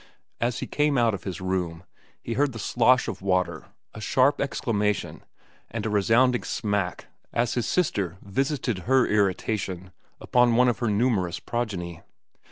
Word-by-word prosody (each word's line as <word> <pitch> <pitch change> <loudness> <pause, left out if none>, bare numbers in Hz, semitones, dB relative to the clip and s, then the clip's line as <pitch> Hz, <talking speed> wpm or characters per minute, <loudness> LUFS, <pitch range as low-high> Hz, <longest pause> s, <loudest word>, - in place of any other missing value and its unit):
As 120 0 -1
he - - -2
came 150 -1 +1
out 115 -2 +3
of 95 - -6
his 95 -2 -5
room 90 -2 -2 0.4
he 115 - -3
heard 140 +2 +1
the - - -7
slosh 125 +3 +3
of - - -5
water, 90 -4 0 0.3
a 110 - -9
sharp 130 +6 +2
exclamation, 105 -7 -1 0.5
and 115 -1 -4
a 110 - -1
resounding 120 +5 +3
smack 105 -5 -2 0.3
as 120 0 0
his 120 - -1
sister 100 - 0
visited 125 0 -1
her 130 -1 +5
irritation 95 -2 -1 0.3
upon 125 -1 +3
one 125 +1 +5
of 120 - -1
her 120 - 0
numerous 100 -6 +1
progeny. 90 -8 -4
110 Hz, 155 wpm, -26 LUFS, 95-125 Hz, 0.5 s, her